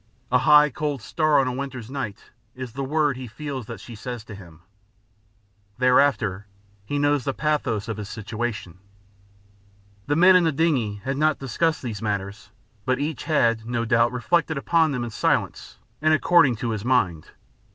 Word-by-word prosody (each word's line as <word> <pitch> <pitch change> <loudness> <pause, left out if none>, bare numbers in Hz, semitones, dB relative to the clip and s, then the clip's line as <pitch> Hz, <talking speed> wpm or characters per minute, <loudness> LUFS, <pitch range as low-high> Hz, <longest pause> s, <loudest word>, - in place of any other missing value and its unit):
A 125 - +4
high 150 +1 +6
cold 145 0 -3
star 155 +2 +2
on 135 - +1
a - - -1
winter's 130 -3 -6
night 130 -8 -6 0.2
is 125 -3 -7
the 135 +2 -4
word 145 -1 0
he 130 -1 -7
feels 135 -1 -6
that 115 - -7
she 120 - -11
says 120 +1 -7
to 110 - -11
him. 90 -5 -13 1.2
Thereafter 125 -6 +2 0.4
he 145 +8 -3
knows 145 -1 +2
the 135 - -2
pathos 135 -8 -1
of 115 -2 -4
his 105 -1 -6
situation. 110 -4 -5 1.3
The 145 - +1
men 185 +4 +6
in 180 - +5
the 165 - +2
dingey 130 -10 0
had 135 +1 -2
not 155 +1 +2
discussed 155 +4 -1
these 110 -5 -5
matters, 100 -1 -4 0.3
but 130 +4 0
each 145 +1 -4
had, 115 -7 +1
no 120 -1 -1
doubt, 115 0 +3
reflected 160 +5 0
upon 160 +2 +2
them 125 -3 -2
in 120 - -5
silence - - -1 0.2
and 155 0 +4
according 155 -6 +4
to 115 +1 -3
his 105 -2 -4
mind. 95 -11 +1
125 Hz, 170 wpm, -24 LUFS, 110-145 Hz, 1.3 s, high